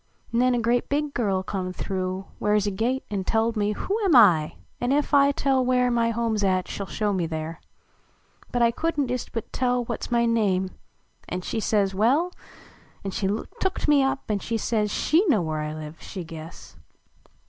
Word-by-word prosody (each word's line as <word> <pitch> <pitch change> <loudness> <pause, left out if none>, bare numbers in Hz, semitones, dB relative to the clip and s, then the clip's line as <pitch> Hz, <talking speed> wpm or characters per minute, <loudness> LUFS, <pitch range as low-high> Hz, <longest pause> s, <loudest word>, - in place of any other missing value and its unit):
Xen 245 +1 +3
a - - +1
grea 235 +1 +2
big 290 0 -1
girl 195 -5 0
come 185 -2 -3
through 185 0 -3
Where 210 0 +2
s 210 -1 +2
a 205 - 0
gate, 240 +7 -1
an 195 -2 -1
telled 225 +3 +1
me 210 0 +1
who 390 - -2
Am 395 -6 +2
T? 180 - +6 0.3
an 245 +1 +1
ef 290 +1 +1
I 280 0 +6
tell 270 -2 +1
where 250 0 +2
My 235 -1 +2
home 230 0 0
s 210 -1 0
at 185 -2 +1
she - - -5
ll 195 - -4
show 210 0 -1
me 175 -3 0
there. 160 0 -5 0.9
But 240 -1 +3
T 230 - +3
couldn 300 +2 -1
t 250 - -2
ist 250 - -4
but 230 - -5
tell 250 -1 +1
What - - -4
s - - -11
my 235 0 +3
name; 195 -5 +1 0.6
an 180 - -3
she 220 - -3
says 205 -3 +1
well, 265 - +2 0.7
An 195 - -3
she 195 - -1 0.3
tooked 380 -4 -1
me 295 -2 +5
up 270 0 -1
an 205 - 0
says 220 -1 -1
She 320 - +2
know 215 - +3
where 155 -1 -2
I 150 0 -3
live, 155 +1 -8
she 185 - -6
guess. 165 0 -10
225 Hz, 205 wpm, -25 LUFS, 190-250 Hz, 0.9 s, T